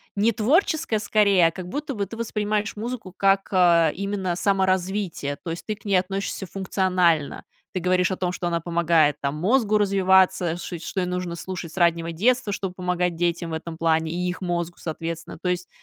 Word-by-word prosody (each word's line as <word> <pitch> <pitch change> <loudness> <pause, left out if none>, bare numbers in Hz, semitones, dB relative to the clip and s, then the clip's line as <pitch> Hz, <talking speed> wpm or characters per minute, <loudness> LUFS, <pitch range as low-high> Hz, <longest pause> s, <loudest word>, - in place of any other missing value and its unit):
не 210 +3 +3
творческое, 275 - +1
скорее, 200 -4 +4
а - - -1
как 180 +1 -8
будто 290 +3 -4
бы 200 -2 -1
ты 225 +4 -9
воспринимаешь 215 -2 -1
музыку, 220 -3 -6
как, 195 0 +2
э, 170 -4 +5
именно 195 -2 -2
саморазвитие. 190 -5 0
То 170 - -4
есть, 165 - -6
ты 215 - -2
к 205 - -25
ней 200 -2 +2
относишься 195 +1 -1
функционально, 185 -5 0 0.3
ты 185 - -1
говоришь 180 0 +2
о 190 - -2
том, 180 -1 -1
что 175 0 -3
она 170 -1 0
помогает 165 -3 +2
там 140 +1 -1
мозгу 215 +5 +2
развиваться, 190 -3 +3
ш 175 0 -6
что 190 - -4
ей 180 - 0
нужно 180 -1 -3
слушать 180 -2 -6
с - - -14
раннего 170 -1 +2
детства, 235 +6 +1
чтобы 190 -2 -3
помогать 180 -1 -1
детям 170 0 -1
в - - -4
этом 160 0 -5
плане, 160 -1 +1
и 180 +2 -2
их 180 +2 -4
мозгу, 175 -1 -2
соответственно. 165 0 -5
То - - -3
есть, 180 0 -2
180 Hz, 195 wpm, -24 LUFS, 170-200 Hz, 0.3 s, э